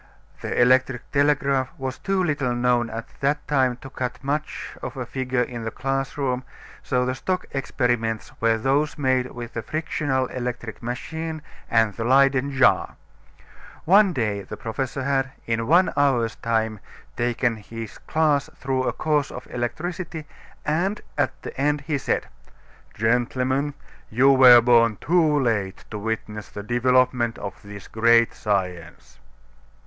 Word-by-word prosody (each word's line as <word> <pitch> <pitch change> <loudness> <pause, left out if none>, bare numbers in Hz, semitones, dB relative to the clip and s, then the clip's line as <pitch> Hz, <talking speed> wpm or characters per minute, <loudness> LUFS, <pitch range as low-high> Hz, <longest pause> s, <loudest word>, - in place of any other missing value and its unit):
The - - -2
electric 130 0 +3
telegraph 140 -2 +2
was 130 -2 -4
too 195 -1 0
little 140 -7 0
known 120 -1 +2
at 115 0 -6
that 145 +2 0
time 130 -4 +2
to 135 - -9
cut 125 -2 -4
much 150 +3 -3
of - - -6
a 130 - -3
figure 130 0 -1
in 120 -1 -6
the 115 - -2
classroom, 135 0 -2 0.4
so 125 -2 0
the 130 - 0
stock 185 +8 -2
experiments 120 -5 -1
were 115 0 +3
those 140 +7 0
made 130 -3 +1
with 120 -1 -8
the 115 - -3
frictional 145 -1 -1
electric 125 -3 -5
machine 155 +6 -5 0.3
and 115 -3 +3
the 115 - -4
Leyden 135 +2 +3
jar. 135 -1 +3 0.9
One 195 +3 +6
day 110 - -1
the 95 - -8
professor 130 +3 -3
had, 135 0 0
in 115 0 -1
one 175 +5 +4
hour's 125 -6 +2
time, 110 -2 -1 0.4
taken 120 -1 0
his 115 +1 -8
class 155 -3 +1
through 130 -1 -1
a - - 0
course 150 -3 0
of 125 - -8
electricity, 155 +6 -4 0.4
and 180 +7 0 0.2
at - - -1
the - - -7
end 145 +1 +1
he 145 -1 -2
said: - - -1 0.7
"Gentlemen, 125 +5 0 0.3
you 130 +5 +5
were 125 -3 +9
born 115 -2 +4
too 155 -2 +3
late 105 -7 -1
to 105 - -4
witness 105 -1 -4
the 105 - -7
development 120 0 +2
of 100 -2 -7
this 100 -1 -10
great 115 +1 +4
science." 90 -5 -3
130 Hz, 145 wpm, -24 LUFS, 115-140 Hz, 0.9 s, were